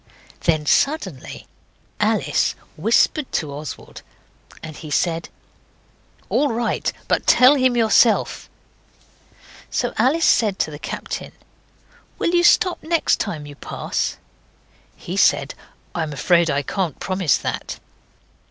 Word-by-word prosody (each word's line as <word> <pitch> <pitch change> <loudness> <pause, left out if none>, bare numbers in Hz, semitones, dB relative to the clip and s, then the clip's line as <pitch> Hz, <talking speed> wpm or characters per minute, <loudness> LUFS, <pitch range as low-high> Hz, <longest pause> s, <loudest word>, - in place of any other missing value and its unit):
Then 155 -3 +2
suddenly 190 - -1 0.5
Alice - - +1 0.2
whispered 235 - +2
to 150 -4 -2
Oswald, 145 -1 -8 0.6
and 155 -1 -8
he 155 - -9
said 165 +2 -1 1.0
'All 290 - +1
right; 230 0 -1 0.2
but - - 0
tell 255 +3 +7
him 255 -3 +2
yourself.' 225 0 +3 1.2
So 245 - -1
Alice 280 +8 +3
said 210 -5 +3
to 155 - -1
the 145 - -9
captain - - -6 0.8
'Will 340 - 0
you 350 0 +3
stop 360 +1 +4
next 330 0 +1
time 160 -9 -4
you 145 - -10
pass?' - - -3 0.8
He - - -7
said, - - +2 0.4
'I'm 160 -3 -3
afraid 170 +4 +2
I 140 0 0
can't 175 +1 -3
promise 185 -6 +1
that. - - -4
190 Hz, 115 wpm, -21 LUFS, 155-255 Hz, 1.2 s, tell